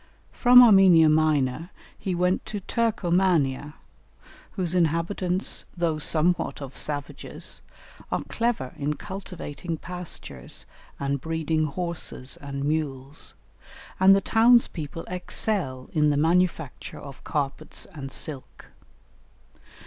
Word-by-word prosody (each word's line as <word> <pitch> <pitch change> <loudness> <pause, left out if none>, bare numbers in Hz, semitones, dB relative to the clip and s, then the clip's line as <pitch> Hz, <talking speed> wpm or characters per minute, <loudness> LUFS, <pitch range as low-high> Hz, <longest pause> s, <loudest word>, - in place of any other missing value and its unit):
From 250 0 +8
Armenia 190 -8 +7
Minor 155 0 +2 0.3
he 185 -2 -3
went 180 +2 +1
to 210 - -4
Turcomania, 175 - +1 0.8
whose 180 -4 -1
inhabitants, 175 +2 0
though 165 -3 0
somewhat 165 +3 +1
of 140 -2 -8
savages, 145 -1 -3 0.5
are - - -1
clever 230 - -2
in 150 +1 -1
cultivating 180 -4 -6
pastures 180 +1 -4 0.3
and 140 -1 -1
breeding 160 0 0
horses 160 -4 -4
and 140 -1 -5
mules; 145 -2 -3 0.6
and 190 +1 +7
the 195 - +2
townspeople 225 -9 +3
excel 180 -7 -2
in 150 -2 +3
the 145 - +1
manufacture 165 -2 0
of 140 -1 -11
carpets 145 +1 -3
and 135 -3 -7
silk. 140 -2 -7
160 Hz, 105 wpm, -25 LUFS, 145-180 Hz, 0.8 s, From